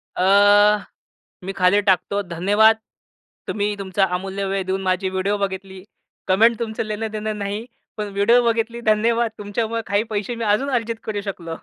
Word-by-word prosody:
अ, 205 +2 +5 0.6
मी 195 - -4
खाली 190 +2 +3
टाकतो, 200 0 +1
'धन्यवाद! 205 +5 +3 0.7
तुम्ही 205 0 -1
तुमचा 195 0 +1
अमूल्य 195 +2 -4
वेळ 195 0 -1
देऊन 190 +1 -2
माझी 190 0 0
व्हिडिओ 190 +2 -1
बघितली. 190 -1 -5 0.4
कमेंट 220 +4 +4
तुमचं 225 -2 -3
लेनं-देनं 215 0 -4
नाही. 205 +3 -4 0.3
पण 210 -1 -4
व्हिडिओ 230 +5 +4
बघितली 230 +1 -3
धन्यवाद! 230 +1 +2
तुमच्यामुळं 220 +2 -3
काही 200 +1 +1
पैसे 215 +3 -2
मी 230 - -4
अजून 270 +7 0
अर्जित 230 -1 -1
करू 205 -2 -3
शकलो.' 175 -5 -6
205 Hz, 150 wpm, -21 LUFS, 195-220 Hz, 0.7 s, अ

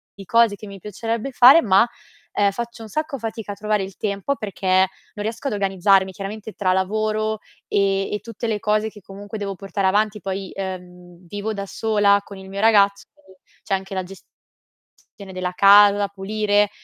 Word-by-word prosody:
di 195 - -11
cose 230 +1 +3
che 210 - -10
mi 195 - -9
piacerebbe 225 +6 -4
fare, 260 +6 +8
ma, 195 +3 +4 0.5
uhm, 200 -1 +2
faccio 235 +2 -6
un 220 - -10
sacco 310 0 -3
fatica 225 -3 -5
a - - -11
trovare 210 0 -1
il 190 0 -8
tempo 200 +6 -2
perché 200 -5 -6
non 190 +2 0
riesco 230 +5 -4
ad 265 - -1
organizzarmi, 195 -1 +2
chiaramente 205 +3 -7
tra 185 -2 +1
lavoro, 215 +3 -1 0.3
e 195 -1 +1
e 210 - -1
tutte 230 +2 -6
le 215 -2 -1
cose 215 0 0
che 210 - -14
comunque 200 +3 -9
devo 200 -1 -4
portare 195 0 -2
avanti. 210 +2 +1
Poi, 195 -1 -4
ehm, 180 -2 -8
vivo 205 +4 -4
da 200 -1 -5
sola 205 -2 +2
con 200 - -11
il 190 0 -11
mio 195 +1 -6
ragazzo, 200 -2 +4 0.6
c'è 195 - -3
anche 190 0 -6
la 185 - -1
gestione 190 +1 -17 0.7
della 185 0 -3
casa 200 +2 +7
da 205 0 0
pulire. 205 +1 +1
205 Hz, 180 wpm, -22 LUFS, 195-215 Hz, 0.7 s, fare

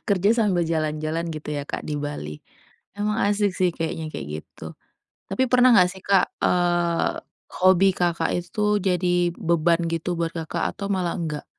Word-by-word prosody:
Kerja 200 0 +3
sambil 195 -7 +2
jalan-jalan 155 +1 -2
gitu 150 -1 -6
ya, 145 - -2
Kak, - - -4
di 150 - -4
Bali. 145 - -5 0.6
Emang 210 +1 -1
asik 205 -1 +1
sih 185 -2 +2
kayaknya 165 -1 -3
kayak, 70 - -6
gitu - - -11 0.5
tapi 245 +6 -1
pernah 250 -1 +6
gak 180 -4 +6
sih, 190 0 -11
Kak, 195 -2 +2
eee, 175 -1 +1 0.4
hobi, 185 +1 +5
Kakak, 175 -1 0
itu 210 +4 0
jadi 180 -2 +1
beban 170 0 +1
gitu 165 +2 -2
buat, 170 -1 -1
Kakak, 165 0 -3
atau 200 - -4
malah 180 -2 -1
enggak? 150 -4 -4
175 Hz, 160 wpm, -24 LUFS, 165-195 Hz, 0.6 s, pernah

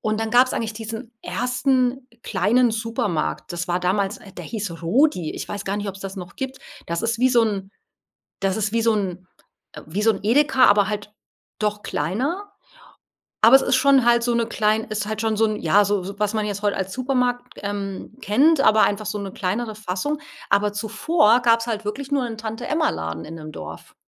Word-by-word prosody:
und 215 0 -1
dann 225 0 -2
gab's 250 +2 +5
eigentlich 225 -1 -2
diesen 225 +2 -7
1. 250 +1 0
kleinen 230 +5 +2
Supermarkt. 220 -8 -2
Das 175 +1 -4
war 175 0 +1
damals 195 +2 0 0.2
der 175 - -6
hieß 200 -5 -5
„Rudi.“ 180 - +2
Ich - - -6
weiß 205 -1 -5
gar 195 +1 -2
nicht, 205 0 -3
ob's 195 0 -7
das 195 0 -6
noch 180 -2 -8
gibt. 265 -1 -5 0.3
Das 170 +4 -2
ist 230 0 0
wie 255 +2 +4
so 240 -2 +4
'n 195 -3 -3 0.7
das 195 -1 0
ist 215 -1 -1
wie 230 - +2
so 230 0 +4
'n 185 -3 -3 0.6
wie 190 +7 -2
so 225 - +5
'n 195 - -5
Edeka, 265 +3 +4
aber 205 -1 +5
halt 210 0 -4 0.5
doch 210 -1 -1
kleiner. 265 - -2 1.0
Aber - - +8
es 270 - +2
ist - - +2
schon 270 -1 +4
halt 235 0 +5
so 240 -1 +1
'ne 235 -1 +1
klein 215 -1 +1
ist 210 -1 -3
halt 215 0 -3
schon 220 -1 0
so 225 +1 +3
'ne 215 -1 -2
ja, 200 +6 +4
so 200 -1 0
so 200 +2 -7
was 210 +1 0
man 215 - 0
jetzt 205 -1 -4
heute 205 -1 +1
als 190 0 -3
Supermarkt, 250 -1 -1
ähm, 200 0 -5
kennt, 280 +9 +4
aber 220 -5 +5
einfach 205 +1 +1
so 210 0 -3
'ne 200 -2 -6
kleinere 215 +5 -2
Fassung. 215 +9 -3 0.3
Aber 200 +1 +3
zuvor 220 +5 +2
gab's 230 -1 +3
halt 220 -2 -3
wirklich 265 +7 -5
nur 275 -3 +2
'n 225 -2 -6
Tante-Emma-Laden 220 - -2
in 165 - -8
dem 155 -1 -9
Dorf. - - -9
215 Hz, 200 wpm, -22 LUFS, 200-245 Hz, 1.0 s, Aber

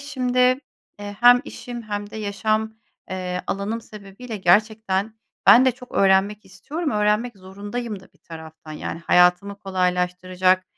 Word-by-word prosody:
şimdi, 255 -3 -3 0.6
eee, 205 0 -8
hem 245 0 +7
işim 240 -4 -8
hem 205 -1 -5
de - - -9
yaşam, 215 +1 -1 0.4
eee, 180 -1 -4
alanım 210 +4 -3
sebebiyle 210 +2 -10
gerçekten 210 +2 +1 0.3
ben 255 +3 +8
de 260 - +3
çok 250 +1 -14
öğrenmek 195 +2 +2
istiyorum. 290 - -5
Öğrenmek 210 +2 0
zorundayım 205 +3 -6
da 190 - -20
bir - - -30
taraftan. 160 -1 -11
Yani, 155 +2 -6
hayatımı 180 +4 +3
kolaylaştıracak, 185 -1 0
205 Hz, 135 wpm, -22 LUFS, 185-225 Hz, 0.6 s, ben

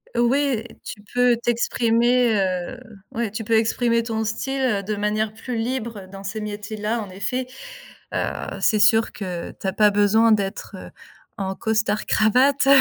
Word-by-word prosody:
Ouais, 240 -1 +2 0.2
tu 205 - -8
peux 245 -1 +4
t'exprimer, 235 0 +2
heu, 190 +5 -1 0.3
ouais 230 -2 -2
tu 220 +2 -5
peux 225 - -1
exprimer 230 +1 +1
ton 225 -1 -2
style 240 -1 -1
de 215 - -1
manière 210 +1 -1
plus 240 +2 -5
libre 225 -4 -3
dans 195 0 -9
ces 210 +3 -4
métiers 210 +1 -5
là 215 +3 -1
en 190 - -10
effet, 250 +7 -2 0.7
heu, - - 0 0.3
c'est 215 - +3
sûr 225 +2 +4
que 180 -4 -5
tu - - -4
as 190 - -1
pas 210 -1 +5
besoin 210 +2 +4
d'être, 200 -1 -1
heu, - - -9 0.5
en 190 -2 -3
costard 215 -1 0
cravate 260 +6 +3
220 Hz, 160 wpm, -23 LUFS, 205-235 Hz, 0.7 s, pas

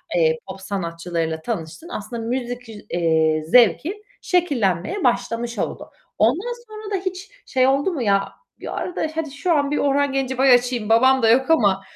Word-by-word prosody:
eee, 160 -2 +3
pop 190 0 -8
sanatçılarıyla 170 -4 -3
tanıştın. 215 - -5
Aslında 230 - -6
müzik, 245 0 -4
üz 210 -2 -11
eee, 160 -2 +2
zevki 295 - +3 0.2
şekillenmeye 290 - 0
başlamış 240 -1 -1
oldu. - - -4 0.3
Ondan 340 - +1
sonra 430 -1 -9
da - - +1
hiç 375 +1 -4 0.2
şey 260 0 +2
oldu 280 +7 +1
mu 290 - -3
ya? 200 -3 +1 0.3
Bir - - -6
ara 360 - -4
da 315 - -1
"Hadi 315 -3 -3
şu 310 +5 0
an 285 -1 +1
bir 295 - 0
Orhan 285 0 +1
Gencebay 265 -1 +3
açayım, 245 -3 +1
babam 260 +4 +5
da 225 - +5
yok 260 +6 +3
ama." 200 -11 +3
245 Hz, 170 wpm, -21 LUFS, 195-285 Hz, 0.3 s, babam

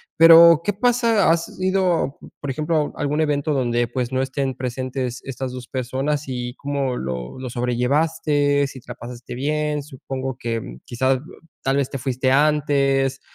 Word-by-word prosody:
pero, 165 0 +8
¿qué 205 - 0
pasa? 230 -4 +3
¿Has 165 +2 -2
ido, 185 -6 +1 0.2
por 140 - -4
ejemplo, 155 +2 -1
a - - -7
algún 145 +1 0
evento 150 -1 0
dónde 120 -2 +1
pues 125 +1 -3
no 130 - 0
estén 135 0 -2
presentes 130 0 -4
estas 130 -1 -5
2 125 -1 -8
personas 135 +4 -2
y 125 -1 -4
cómo 140 -2 -2
lo 65 - -5
lo 130 -1 -5
sobrellevaste, 145 +4 +1
si 135 - -10
te - - -22
la - - -4
pasaste 120 0 -9
bien? 150 +3 -1
Supongo 135 -2 -6
que, 115 - -4
¿quizás 130 +2 +1 0.5
tal 135 +1 +1
vez 140 -2 0
te - - -4
fuiste 130 0 -1
antes, 140 -2 +2
135 Hz, 160 wpm, -22 LUFS, 125-150 Hz, 0.5 s, pero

